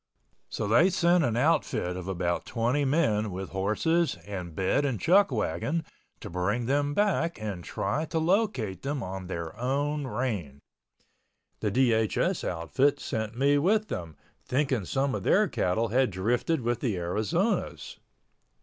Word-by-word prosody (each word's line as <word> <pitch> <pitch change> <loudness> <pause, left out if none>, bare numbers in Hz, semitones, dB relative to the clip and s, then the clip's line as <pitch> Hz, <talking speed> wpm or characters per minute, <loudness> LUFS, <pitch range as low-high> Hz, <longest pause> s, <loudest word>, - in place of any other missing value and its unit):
So 105 - -3
they 150 - +5
sent 175 -1 +3
an 115 -5 0
outfit 125 - +1
of 90 0 -6
about 85 -2 -2
20 125 +5 0
men 125 -8 +1
with 95 0 -5
horses 130 - +1
and 90 -5 -6
bed 95 - +1
and 135 -7 -1
chuckwagon 160 - +2 0.4
to - - -7
bring 100 +7 -1
them 145 +3 0
back 180 - +1
and 100 -5 -5
try 155 - -2
to 165 - -3
locate 160 - 0
them 140 -2 -3
on 95 0 -6
their 85 -3 -5
own 140 +3 -1
range. 105 - -3 1.0
The 105 - 0
DHS 115 -2 +1
outfit 85 - +1
sent 110 +1 -4
me 140 +2 +3
with 215 +7 +2
them, 85 -3 -5 0.3
thinking 130 -6 0
some 135 +6 0
of - - -2
their 210 +2 +3
cattle 110 - 0
had 130 +3 +2
drifted 120 - 0
with 120 0 -1
the 115 -8 -1
Arizona's. 110 - -1
120 Hz, 145 wpm, -28 LUFS, 95-145 Hz, 1.0 s, they